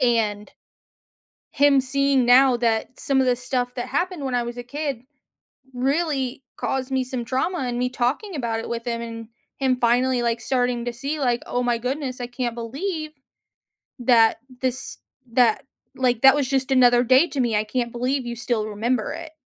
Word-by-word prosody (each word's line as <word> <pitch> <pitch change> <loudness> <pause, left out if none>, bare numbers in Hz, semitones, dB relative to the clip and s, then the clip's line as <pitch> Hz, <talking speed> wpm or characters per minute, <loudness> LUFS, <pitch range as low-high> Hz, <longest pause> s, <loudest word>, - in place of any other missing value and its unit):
And 220 -4 +1 1.0
him 280 -1 +4
seeing 275 -1 +1
now 250 +1 +6
that 230 +1 -1
some 270 -1 +1
of 260 - +2
the 250 - +3
stuff 250 0 -2
that 245 0 -4
happened 350 -3 -2
when 260 -2 -2
I 245 - +2
was 240 +1 -6
a 245 - -5
kid 280 -1 -4 0.7
really 270 0 -1
caused 265 0 -2
me 260 -1 +1
some 250 -2 -5
trauma 300 +9 -1
and 245 -2 -2
me 250 0 0
talking 265 - -2
about 230 -4 -2
it - - -6
with 235 0 -4
him 235 -1 -2
and 230 -1 -7 0.3
him 260 -2 +1
finally 245 +1 +2
like 235 -1 0
starting 245 -2 0
to 240 - -3
see 280 +6 -4
like, 245 -3 +1
"Oh 245 0 -1
my 240 -1 +1
goodness, 255 +1 -3
I 245 - -3
can't 240 -1 -3
believe 310 - -4 0.9
that 230 -2 +4 0.2
this 260 0 -3 0.3
that, 240 +1 +3 0.3
like, 250 -2 0
that 270 0 +8
was 280 -3 0
just 270 -1 0
another 245 -1 +5
day 260 +7 +5
to 275 - -3
me. 235 -3 +1
I 210 - +1
can't 235 +2 -2
believe 255 +2 -1
you 240 - -3
still 230 -2 -1
remember 220 +2 -1
it," 330 -1 -8
250 Hz, 185 wpm, -23 LUFS, 240-270 Hz, 1.0 s, that